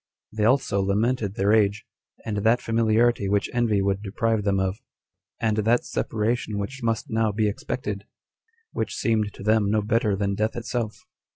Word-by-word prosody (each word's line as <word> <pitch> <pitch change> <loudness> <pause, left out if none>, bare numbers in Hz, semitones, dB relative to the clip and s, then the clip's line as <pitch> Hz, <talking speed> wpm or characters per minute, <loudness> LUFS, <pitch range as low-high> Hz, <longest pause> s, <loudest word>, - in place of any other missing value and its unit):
They 110 -1 0
also 115 -5 +2
lamented 105 +1 0
their 100 +2 +2
age, 105 -1 +2 0.4
and 105 -2 -2
that 110 +4 +3
familiarity 115 -1 +2
which 100 0 0
envy 110 -5 +2
would 100 0 0
deprive 110 +1 -1
them 100 -1 +1
of, 95 +1 -1 0.6
and 110 -2 0
that 115 +3 +2
separation 110 0 -1
which 125 +7 -5
must 115 -2 -1
now 110 -1 +2
be 105 +1 +1
expected, 105 -1 -4 0.6
which - - -3
seemed 110 -2 0
to - - -10
them 110 -1 +3
no 105 0 +1
better 110 -1 +1
than 100 0 -1
death 110 +3 -1
itself. 115 -2 -4
110 Hz, 165 wpm, -25 LUFS, 100-115 Hz, 0.6 s, that